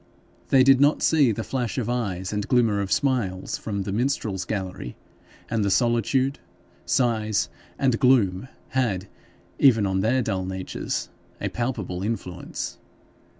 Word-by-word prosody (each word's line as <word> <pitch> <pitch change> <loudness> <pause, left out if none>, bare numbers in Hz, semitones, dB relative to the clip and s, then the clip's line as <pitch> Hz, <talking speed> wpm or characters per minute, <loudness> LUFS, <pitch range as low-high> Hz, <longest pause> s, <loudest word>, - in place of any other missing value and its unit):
They 130 -1 +6
did 135 0 +6
not 145 +2 +4
see 145 -7 +4
the 110 +1 -3
flash 125 -1 -3
of 120 -4 -1
eyes 100 -6 -2
and 105 0 -2
glimmer 115 -5 +3
of 95 -1 -4
smiles 120 -9 0
from 100 -3 -3
the 100 - -4
minstrel's 110 -5 -1
gallery, 95 - -4 0.5
and 115 -2 0
the 100 - +1
solitude, 120 +5 +2 0.5
size, 110 -5 +1 0.3
and 130 -4 +1
gloom 115 -5 +3 0.2
had, 105 -8 0 0.5
even 115 -7 +5
on 95 -1 0
their 120 +6 +2
dull 95 -4 -1
natures, 95 0 -4 0.3
a - - -2
palpable 110 -7 -3
influence. 95 -4 -4
110 Hz, 140 wpm, -25 LUFS, 95-130 Hz, 0.5 s, They